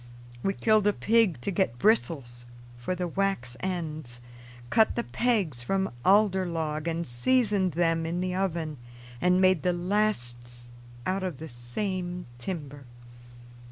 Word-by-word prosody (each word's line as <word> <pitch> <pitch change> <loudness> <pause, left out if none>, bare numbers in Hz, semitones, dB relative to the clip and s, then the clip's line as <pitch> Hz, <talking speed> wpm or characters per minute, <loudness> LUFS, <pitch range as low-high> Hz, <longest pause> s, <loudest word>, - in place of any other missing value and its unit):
We 195 - 0
killed 215 0 +3
a 205 - +4
pig 220 - +2
to 200 - -2
get 170 - 0
bristles 130 - +1 0.3
for 120 +10 -3
the 180 0 -2
wax 175 -10 -1
ends, 155 -9 -4 0.5
cut 220 -1 +4
the 235 - 0
pegs 205 - 0
from 195 +10 0
alder 190 -2 +4
log 160 -2 -2
and 165 0 -1
seasoned 195 - +2
them 165 0 +1
in 170 +2 -2
the 180 0 -1
oven, 170 -5 -2 0.4
and 180 +1 +4
made 185 -3 +4
the 180 - +1
lasts 120 - -1 0.3
out 190 +1 0
of 185 -7 -3
the 160 - -7
same 175 - -3
timber. 145 -2 -5
175 Hz, 140 wpm, -28 LUFS, 145-195 Hz, 0.5 s, a